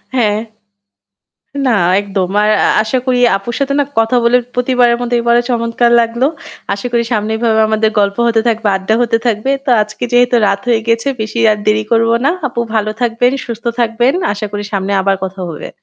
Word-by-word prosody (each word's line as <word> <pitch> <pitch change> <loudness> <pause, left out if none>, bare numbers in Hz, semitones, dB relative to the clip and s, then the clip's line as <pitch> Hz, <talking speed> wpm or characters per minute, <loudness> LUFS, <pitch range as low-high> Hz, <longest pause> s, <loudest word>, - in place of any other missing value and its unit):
হ্যাঁ। 215 -3 +1 1.3
না 235 -4 +3 0.2
একদম। 195 -2 -2
আর 210 - +2 0.2
আ - - +2
আশা 240 +4 -1
করি 250 -1 +1 0.2
আপুর 195 +5 -6
সাথে 275 0 0
না 285 - +2
কথা 225 +3 +2
বলে 235 +1 +4 0.2
প্রতিবারের 245 -1 +2
মত 245 0 -3
এবার 235 0 +2
চমৎকার 235 0 +1
লাগলো। 235 +3 0 0.5
আশা 200 - -6
করি 235 -1 +1
সামনে 215 0 -1
এভাবে 220 -1 +1
আমাদের 220 0 +1
গল্প 200 0 0
হতে 230 -1 +2
থাকবে, 225 -1 -1
আড্ডা 190 +3 -1
হতে 230 -1 +1
থাকবে। 225 +3 0
তো 270 - -1
আজকে 215 +4 -6
যেহেতু 245 0 +3
রাত 200 0 0
হয়ে 230 -2 +2
গিয়েছে, 230 +3 0
বেশি 220 +2 -4
আর 210 - -3
দেরি 215 0 +2
করব 230 0 +3 0.2
না। - - +4 0.2
আপু 240 -2 -3
ভালো 215 -1 0
থাকবেন, 245 +1 +1
সুস্থ 235 0 -7 0.2
থাকবেন। 240 +3 +1 0.2
আশা 210 +1 -4
করি 205 0 -4
সামনে 200 0 -2
আবার 195 0 +1
কথা 190 0 -7
হবে। 160 - -7
230 Hz, 190 wpm, -14 LUFS, 210-240 Hz, 1.3 s, বলে